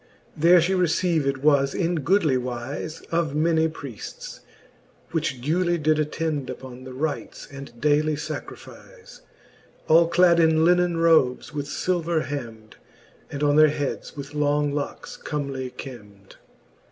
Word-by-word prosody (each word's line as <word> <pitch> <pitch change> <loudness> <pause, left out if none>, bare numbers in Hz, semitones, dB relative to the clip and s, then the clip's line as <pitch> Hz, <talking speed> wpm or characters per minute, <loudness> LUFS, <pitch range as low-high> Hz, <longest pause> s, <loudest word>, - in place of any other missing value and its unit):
* - - -33
IV. - - -11
There 175 +2 +7
fhe 185 +3 +1
received 160 -5 +1
was 140 -1 +2
in 175 -1 0
goodly 160 -2 +2
wlze 125 +5 -5
Of 165 -4 0
many 160 +1 +2
priefts, 140 -8 -9 0.7
which 155 -6 -2
duely 175 +4 +1
did 155 0 +1
attend 150 -2 -2
Uppon 130 0 -9
the 130 - -8
rites 140 -4 -4
and 140 -4 -10
daily 150 +2 +2
facrifize, 155 - -9 0.7
All 165 +1 +6
clad 170 0 +4
in 160 -1 +4
linen 175 -1 +3
robes 160 -6 +2
with 145 -1 -4
filver 170 0 -1
hemd; 115 -6 -7 0.5
And 145 +1 -4
on 145 0 +3
their 155 0 +7
heads 145 -1 -4
with 140 +1 -7
long 145 0 +1
locks 145 -1 -5
comely 140 -4 -4
kemd. 105 -6 -12
150 Hz, 140 wpm, -24 LUFS, 135-165 Hz, 0.7 s, There